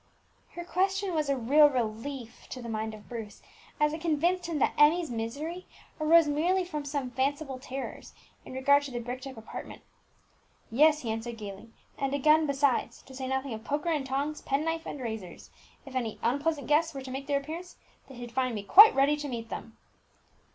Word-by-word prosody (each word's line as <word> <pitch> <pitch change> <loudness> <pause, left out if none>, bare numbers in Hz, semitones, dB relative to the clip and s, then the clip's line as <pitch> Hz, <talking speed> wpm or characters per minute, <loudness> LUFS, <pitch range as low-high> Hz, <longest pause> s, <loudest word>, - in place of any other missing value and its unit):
Her 345 - -6
question 385 +1 0
was 305 -3 0
a 275 - +2
real 290 +5 +6
relief 240 0 -4
to 255 - -6
the 240 - -7
mind 220 0 -3
of 210 - -15
Bruce, 225 -3 -8 0.4
as 300 0 +3
it 315 - -5
convinced 340 +2 +1
him 330 -3 -2
that - - +2
Emmie's 310 0 +4
misery 285 +11 -4 0.3
arose 320 +1 +6
merely 350 +6 +1
from 300 -5 -5
some 280 -3 -3
fanciful 270 +1 -1
terrors 265 +1 -7 0.3
in - - -10
regard 280 +2 +4
to 285 -2 -7
the 245 - -4
bricked 250 +3 -6
up 260 -3 -9
apartment. 220 - -9 0.9
"Yes," 300 +5 +5
he 225 - -2
answered 225 +1 -4
gaily, 205 +1 -8 0.3
"and 275 0 0
a - - +1
gun 305 +2 +4
besides, 280 -2 0
to 265 - -14
say 260 0 -5
nothing 265 -1 -2
of 220 0 -7
poker 295 +6 -1
and 305 -4 0
tongs, 280 +3 -2
pen 280 +3 -1
knife, 325 0 -2
and - - -6
razors. 220 -7 -7 0.3
If 270 - -10
any 235 -4 -2
unpleasant 285 +5 0
guests 310 +1 +2
were 270 - -5
to 260 - -7
make 270 +1 -5
their 285 -1 +2
appearance, 330 +5 -8 0.3
they 265 - -11
should 240 -1 -8
find 255 -1 0
me 205 - -4
quite 415 - +9
ready 275 +2 +4
to 295 0 -5
meet 230 -3 -5
them." 225 - -7
275 Hz, 200 wpm, -29 LUFS, 245-305 Hz, 0.9 s, quite